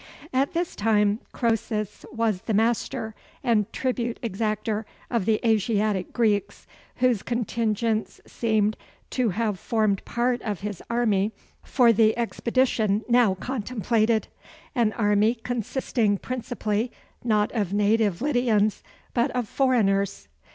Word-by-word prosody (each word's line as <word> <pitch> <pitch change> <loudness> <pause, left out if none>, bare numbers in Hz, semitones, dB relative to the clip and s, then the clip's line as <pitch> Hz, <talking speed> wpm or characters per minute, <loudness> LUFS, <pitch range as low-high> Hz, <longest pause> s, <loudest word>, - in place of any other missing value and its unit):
At 270 +2 +1
this 345 0 -2
time 210 -1 +2
Croesus 220 -3 -2
was 225 -5 0
the 220 - -1
master 225 +1 0 0.3
and 215 -4 +2
tribute 245 -2 -2
exactor 215 0 -1 0.3
of 230 -6 0
the 220 -1 +3
Asiatic 210 -3 +1
Greeks, 215 -4 0 0.3
whose 245 -5 +2
contingents 230 -2 -1
seem 215 -2 +1 0.4
to 250 -3 +1
have 210 -1 -1
formed 215 -4 0
part 240 +1 0
of 205 -5 -4
his 205 -3 -5
army 220 -3 +1 0.3
for 240 -3 +4
the 220 +1 +3
expedition 235 -3 +1
now 240 -5 +4
contemplated; 225 0 0 0.5
an 235 -5 +2
army 210 +1 +2
consisting 230 -2 -1
principally, 235 -1 -2 0.3
not 215 -2 +2
of 205 -6 -1
native 205 0 +2
Lydians, 235 -7 +2 0.3
but 240 +3 +2
of 245 -3 -1
foreigners. 205 -7 +1
220 Hz, 115 wpm, -25 LUFS, 210-240 Hz, 0.5 s, for